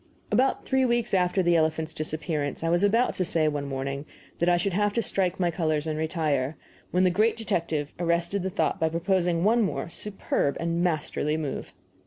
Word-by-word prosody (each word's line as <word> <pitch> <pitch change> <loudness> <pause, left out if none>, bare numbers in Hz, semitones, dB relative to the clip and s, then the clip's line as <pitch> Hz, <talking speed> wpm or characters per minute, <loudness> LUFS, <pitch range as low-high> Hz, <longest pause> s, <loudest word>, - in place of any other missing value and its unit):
About 265 +2 +2
three 265 0 +2
weeks 240 -3 +1
after 185 0 +2
the 175 0 +3
elephant's 160 0 +1
disappearance 155 -1 -3
I 165 - +1
was 175 +3 +2
about 230 +5 +3
to 185 - +1
say, 165 -3 +2
one 145 -2 -2
morning, 140 +1 -4 0.3
that 170 - +3
I 175 - +4
should 185 +2 -1
have 205 +2 +1
to 230 - 0
strike 185 -2 0
my 175 -2 +2
colors 155 -3 0
and 155 -1 -2
retire, 155 -3 -1 0.3
when 180 +1 +2
the 185 - +4
great 215 +5 +2
detective 165 -8 -2
arrested 170 +3 0
the 190 - -2
thought 190 - 0
by 160 -1 +2
proposing 170 0 +1
one 230 +4 +4
more 195 -4 -1
superb 195 -9 -2
and 170 0 -1
masterly 155 -2 0
move. 150 -4 -5
170 Hz, 195 wpm, -26 LUFS, 155-190 Hz, 0.3 s, I